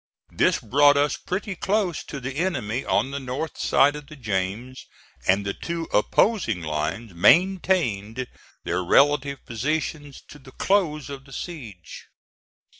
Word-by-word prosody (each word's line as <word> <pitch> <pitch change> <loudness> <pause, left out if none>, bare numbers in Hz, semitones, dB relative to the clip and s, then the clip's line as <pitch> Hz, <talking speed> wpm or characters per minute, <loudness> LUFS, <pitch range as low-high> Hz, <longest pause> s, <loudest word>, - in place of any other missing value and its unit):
This - - +2
brought 145 +5 +4
us 145 0 +2
pretty 195 +2 -4
close 195 -2 0
to 140 - -6
the 135 +1 -5
enemy 130 - -1
on 135 - +1
the 140 - -3
north 135 +4 -5
side 145 +2 +3
of 150 -1 -9
the 155 - -11
James, 110 +1 -4 0.4
and 95 +2 +3
the 100 - -1
two 170 -1 -4
opposing 110 - +2
lines 80 +8 -3
maintained 130 - +2 0.4
their 90 +2 -1
relative 140 +6 +3
positions 145 +3 -3
to 145 - -12
the 130 -1 -15
close 165 -8 +1
of 135 -1 -8
the 135 - -16
siege. 115 - -8
135 Hz, 140 wpm, -24 LUFS, 110-160 Hz, 0.4 s, brought